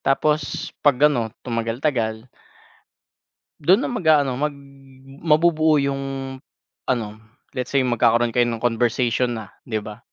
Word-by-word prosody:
Tapos 150 +1 0
'pag 145 -3 +4
ano, 125 -7 +3 0.2
tumagal-tagal 115 -1 -2 1.3
dun 180 +6 +4
na - - -2
mag-aano 155 - +2
mag 150 +1 -1 0.6
mabubuo 155 -1 +3
'yung 140 0 -1 0.8
ano, 120 -4 0 0.5
let's 125 +2 -4
say 135 - +4
magkakaroon 120 -1 +2
kayo 120 +1 +2
ng 115 -1 -4
conversation 120 +1 +1
na, 110 -3 -7 0.2
'di 110 -4 -2
ba? 105 0 -9
125 Hz, 120 wpm, -22 LUFS, 115-150 Hz, 1.3 s, pag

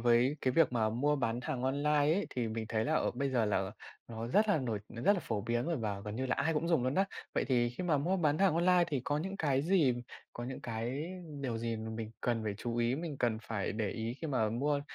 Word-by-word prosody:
với 120 +5 +4
cái 130 - +1
việc 160 -3 +4
mà 110 -2 +2
mua 145 +6 +1
bán 120 -2 -1
hàng 125 0 -3
online 140 +3 +1
ấy, 150 +7 +3
thì 120 -3 -1
mình 110 0 -3
thấy 110 -1 0
là, - - 0
ờ, - - +2
bây 135 +2 -1
giờ 120 -3 +2
là 95 -2 0 0.4
nó 115 0 -5
rất 210 - +3
là 200 - +4
nổi 115 -6 -1
nó 115 0 -7
rất 205 - +6
là 195 - -1
phổ 110 -9 -2
biến 120 +3 -1
rồi 170 0 0
và 105 -5 -2
gần 105 +2 -5
như 130 - -1
là - - +1
ai 160 +3 +1
cũng 165 +3 0
dùng 165 -7 +3
luôn 130 +2 0
á. 195 - +4 0.3
Vậy - - +1
thì 120 -2 +2
khi 125 +9 -5
mà 155 -5 +2
mua 180 +7 +1
bán 155 -3 +2
hàng 190 -5 +4
online 175 +1 +4
thì 145 -5 -1
có 145 +2 0
những 190 +4 -4
cái 140 -3 +1
gì 160 -7 +3 0.4
có 120 - -5
những 130 +1 -5
cái 120 +5 -3 0.4
điều 120 -4 -2
gì 115 0 -2
mà 110 0 -5
mình 110 0 -5
cần 115 -2 0
phải 105 -2 -1
chú 120 0 -3
ý, 120 +1 +2
mình 155 -1 -4
cần 115 -3 +1
phải 105 -4 -2
để 110 -1 -1
ý 115 +1 -3
khi 160 - -3
mà 125 -7 +1
mua 140 +5 +1
125 Hz, 275 wpm, -33 LUFS, 115-150 Hz, 0.4 s, rất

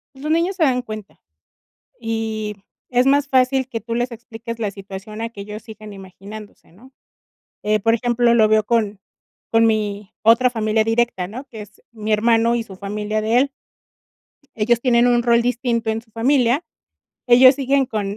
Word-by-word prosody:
los 295 +3 -4
niños 340 +4 +1
se 355 - +1
dan 255 -4 +2
cuenta, 215 -3 -9 0.8
y 220 -2 -3 0.3
es 250 0 +2
más 285 +1 +3
fácil 260 -1 +2
que 230 -3 -5
tú 230 +1 -5
les 245 +1 -1
expliques 230 0 -8
la 210 -3 -2
situación 195 +2 -9
a 230 - -2
que 210 -3 -10
ellos 210 +1 -8
sigan 215 -1 -11
imaginándose, 200 +1 -12
¿no?, 255 +9 -19 0.7
eh, 215 0 +1
por 225 +3 +2
ejemplo, 240 0 +2
lo 220 -2 +5
veo 215 0 +3
con 210 -3 0 0.5
con 225 0 +4
mi 210 -2 -2
otra 230 +3 +5
familia 220 -2 0
directa, 225 -5 0
¿no?, 250 +7 -8
que 220 -3 -9
es 205 - -17
mi 215 -1 -3
hermano 230 +2 +3
y 235 - -1
su 195 -4 -12
familia 210 +2 -3
de 220 +3 +2
él. 275 +2 +2 1.1
Ellos 230 +2 +2
tienen 240 -1 +3
un 240 -1 +3
rol 235 0 +3
distinto 235 -2 -1
en 220 0 -2
su 225 -1 -30
familia, 250 +4 +2 0.6
ellos 255 +2 +7
siguen 275 0 +1
con 205 -4 -4
225 Hz, 175 wpm, -20 LUFS, 215-245 Hz, 1.1 s, ellos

